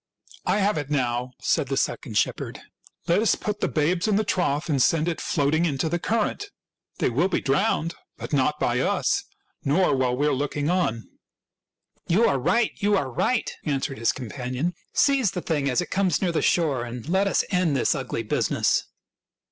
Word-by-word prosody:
" -, -, -21 dB
I -, -, +3 dB
have 205 Hz, -4 st, +1 dB
it 145 Hz, -1 st, -5 dB
now," 125 Hz, -3 st, 0 dB
said 140 Hz, -, +1 dB
the 135 Hz, +1 st, -2 dB
second 110 Hz, -5 st, -1 dB
shepherd. -, -, -1 dB, 0.2 s
" -, -, -28 dB
Let 170 Hz, +5 st, +3 dB
us 220 Hz, -, +3 dB
put 210 Hz, 0 st, -4 dB
the -, -, +1 dB
babes 170 Hz, +5 st, 0 dB
in 210 Hz, -, +2 dB
the 215 Hz, -, +2 dB
trough 170 Hz, -6 st, 0 dB
and 140 Hz, -5 st, +1 dB
send 160 Hz, +4 st, +3 dB
it 170 Hz, -, -2 dB
floating 155 Hz, +2 st, +1 dB
into 155 Hz, 0 st, -1 dB
the 175 Hz, -, -1 dB
current. 230 Hz, -, -1 dB, 0.5 s
They -, -, +1 dB
will 155 Hz, +10 st, +2 dB
be 185 Hz, -, 0 dB
drowned, 150 Hz, +4 st, +1 dB, 0.2 s
but -, -, -7 dB
not 145 Hz, +2 st, +1 dB
by 120 Hz, +1 st, +1 dB
us -, -, +1 dB, 0.4 s
nor 160 Hz, +3 st, +2 dB
while 125 Hz, -1 st, 0 dB
we 145 Hz, -, +1 dB
are 150 Hz, -, +2 dB
looking 145 Hz, +3 st, -1 dB
on." 145 Hz, -12 st, 0 dB, 0.5 s
" -, -, -46 dB
You 205 Hz, +8 st, +4 dB
are 140 Hz, -2 st, +2 dB
right! 230 Hz, -, +2 dB
You 205 Hz, -1 st, +2 dB
are 135 Hz, -7 st, -2 dB
right! 245 Hz, -, 0 dB
" -, -, -41 dB
answered 135 Hz, -4 st, -2 dB
his 115 Hz, -, +2 dB
companion. 130 Hz, +7 st, -4 dB
" -, -, -45 dB
Seize 275 Hz, -6 st, +3 dB
the 180 Hz, -, -4 dB
thing 145 Hz, -5 st, -1 dB
as 125 Hz, -, +1 dB
it -, -, -7 dB
comes 185 Hz, -5 st, +1 dB
near 185 Hz, -3 st, 0 dB
the 165 Hz, -, 0 dB
shore, 145 Hz, -8 st, +1 dB
and 120 Hz, +1 st, -7 dB
let 190 Hz, +4 st, +2 dB
us -, -, +2 dB
end 180 Hz, -7 st, +2 dB
this 120 Hz, -, +2 dB
ugly 130 Hz, -5 st, -3 dB
business." 105 Hz, -, +1 dB
150 Hz, 205 wpm, -25 LUFS, 130-185 Hz, 0.5 s, You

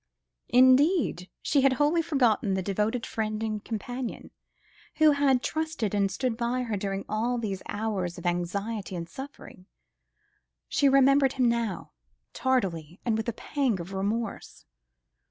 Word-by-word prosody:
Indeed, 260 Hz, -, +4 dB
she 285 Hz, -, +3 dB
had 270 Hz, -1 st, +4 dB
wholly 295 Hz, +5 st, +2 dB
forgotten 245 Hz, -, +1 dB
the 190 Hz, -, -1 dB
devoted 210 Hz, +5 st, -1 dB
friend 215 Hz, 0 st, -3 dB
and 215 Hz, -1 st, -3 dB
companion, 245 Hz, +2 st, -5 dB, 0.6 s
who 310 Hz, -1 st, +6 dB
had 275 Hz, -3 st, +2 dB
trusted 315 Hz, -10 st, -2 dB
and 200 Hz, -1 st, +2 dB
stood 245 Hz, +4 st, -1 dB
by 245 Hz, +2 st, -1 dB
her 225 Hz, -3 st, -2 dB
during 195 Hz, 0 st, -3 dB
all 235 Hz, +3 st, -1 dB
these 200 Hz, -5 st, -3 dB
hours 205 Hz, -5 st, -2 dB
of -, -, -9 dB
anxiety 190 Hz, +4 st, -2 dB
and 170 Hz, -1 st, -5 dB
suffering. 265 Hz, -6 st, -10 dB, 1.0 s
She 280 Hz, -, +3 dB
remembered 275 Hz, 0 st, +5 dB
him 255 Hz, -2 st, +2 dB
now, 235 Hz, -4 st, -1 dB, 0.4 s
tardily 180 Hz, -, -1 dB
and 230 Hz, -3 st, +1 dB
with 220 Hz, +1 st, -2 dB
a -, -, -3 dB
pang 255 Hz, -4 st, -1 dB
of 175 Hz, +3 st, -7 dB
remorse. 205 Hz, +3 st, -3 dB
225 Hz, 140 wpm, -27 LUFS, 200-260 Hz, 1.0 s, who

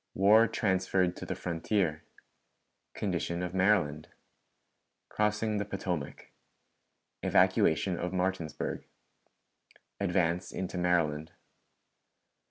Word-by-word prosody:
War 105 Hz, +4 st, +6 dB
transferred 95 Hz, -3 st, +1 dB
to -, -, -7 dB
the -, -, -3 dB
Frontier. 85 Hz, -1 st, -1 dB, 0.9 s
Condition 85 Hz, +1 st, -2 dB
of 90 Hz, -, -4 dB
Maryland. 95 Hz, -6 st, +2 dB, 1.0 s
Crossing 105 Hz, 0 st, 0 dB
the 105 Hz, -, 0 dB
Potomac. 90 Hz, -7 st, -5 dB, 0.9 s
Evacuation 85 Hz, +3 st, +3 dB
of 90 Hz, -, -2 dB
Martinsburg. 90 Hz, -4 st, -2 dB, 1.1 s
Advance 90 Hz, -2 st, 0 dB
into 95 Hz, -1 st, -4 dB
Maryland. 85 Hz, -2 st, 0 dB
90 Hz, 80 wpm, -30 LUFS, 85-100 Hz, 1.1 s, War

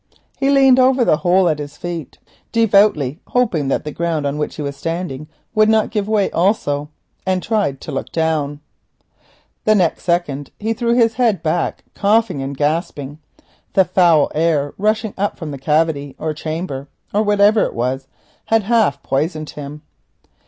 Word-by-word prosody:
He 275 Hz, -, +2 dB
leant 270 Hz, -2 st, +5 dB
over 255 Hz, -1 st, +4 dB
the 155 Hz, -, +3 dB
hole 180 Hz, +2 st, +3 dB
at 155 Hz, -2 st, 0 dB
his 145 Hz, 0 st, -7 dB
feet, 170 Hz, -5 st, -6 dB, 0.3 s
devoutly 200 Hz, -, +3 dB
hoping 215 Hz, -, +1 dB
that 135 Hz, -, 0 dB
the 150 Hz, -, -5 dB
ground 165 Hz, -2 st, -2 dB
on 140 Hz, +1 st, -2 dB
which 150 Hz, -, -3 dB
he 150 Hz, -, -5 dB
was 140 Hz, 0 st, -4 dB
standing 165 Hz, -2 st, -4 dB, 0.3 s
would 215 Hz, -1 st, +4 dB
not 220 Hz, -1 st, +2 dB
give 210 Hz, -2 st, -1 dB
way 215 Hz, -2 st, +1 dB
also, 150 Hz, -6 st, 0 dB, 0.3 s
and 185 Hz, -1 st, -1 dB
tried 205 Hz, -, 0 dB
to -, -, -7 dB
look 135 Hz, -, -4 dB
down. 155 Hz, -3 st, -1 dB, 1.0 s
Next 200 Hz, -6 st, +2 dB
second 160 Hz, -6 st, -1 dB
he 220 Hz, +2 st, -1 dB
threw 235 Hz, +1 st, 0 dB
his 230 Hz, -2 st, +3 dB
head 215 Hz, -9 st, +2 dB
back 165 Hz, +1 st, -1 dB
coughing 205 Hz, -7 st, +1 dB
and 135 Hz, 0 st, -5 dB
gasping. 150 Hz, -1 st, -2 dB, 0.5 s
The 190 Hz, -, +4 dB
foul 175 Hz, -5 st, +3 dB
air 155 Hz, -3 st, +1 dB
rushing 215 Hz, +1 st, 0 dB
up 205 Hz, +1 st, -1 dB
from 160 Hz, -4 st, -6 dB
the 140 Hz, -, -7 dB
cavity 150 Hz, -1 st, 0 dB
or 155 Hz, 0 st, -3 dB
chamber, 155 Hz, -3 st, -5 dB, 0.3 s
or 210 Hz, -, +3 dB
whatever 210 Hz, 0 st, +4 dB
it -, -, -5 dB
was, 130 Hz, +3 st, -2 dB, 0.4 s
had 225 Hz, -1 st, +2 dB
half 215 Hz, -10 st, +1 dB
poisoned 155 Hz, +3 st, -2 dB
him. 150 Hz, +1 st, -9 dB
170 Hz, 165 wpm, -18 LUFS, 145-210 Hz, 1.0 s, leant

